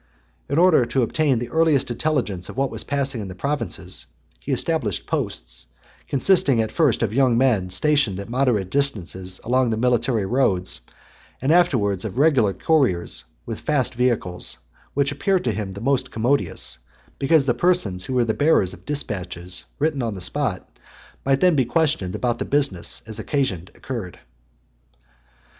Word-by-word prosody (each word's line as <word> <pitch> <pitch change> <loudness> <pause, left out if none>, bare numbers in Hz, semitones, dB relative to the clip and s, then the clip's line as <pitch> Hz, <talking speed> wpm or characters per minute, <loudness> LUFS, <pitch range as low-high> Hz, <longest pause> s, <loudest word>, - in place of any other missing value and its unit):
In 140 - 0
order 175 -6 +5
to 120 +2 0
obtain 140 +2 +1
the 120 +1 -4
earliest 160 -6 +2
intelligence 115 - -1
of - - -9
what 135 0 0
was - - -2
passing 140 -4 -1
in 100 - -6
the 90 - -8
provinces, 140 +8 -3 0.3
he - - -5
established - - 0
posts, - - -3 0.4
consisting 140 -3 +4
at 110 -1 0
first 150 -9 +2
of 110 -2 -1
young 130 -2 +3
men 115 -8 +2
stationed 110 0 +1
at 100 - -6
moderate 120 -6 0
distances 95 -9 0
along 125 +1 +2
the 110 - -1
military 120 -2 +1
roads, 95 - +1 0.6
and 135 +4 +1
afterwards 120 - +2
of - - -5
regular 135 -8 +4
couriers 95 - 0 0.2
with - - -5
fast 140 -5 0
vehicles; 120 -7 0 0.4
which 140 0 +2
appeared 180 +7 0
to 120 - +1
him 100 -2 -4
the 100 - -8
most 130 0 +1
commodious, 110 - -1 0.4
because 140 +1 +3
the 125 - +2
persons 110 - 0
who 130 - -3
were 125 -1 +3
the 110 - 0
bearers 145 - +2
of - - -15
dispatches, 90 -10 -3
written 150 -2 0
on 115 -3 -2
the - - -7
spot, 115 -1 -2 0.6
might 135 0 +2
then 180 -3 +5
be 135 - +3
questioned 140 - 0
about 120 -1 -1
the - - -1
business, 135 -12 0
as 110 -1 -6
occasion 110 - -1
occurred. 115 -9 -6
125 Hz, 160 wpm, -22 LUFS, 100-140 Hz, 0.6 s, order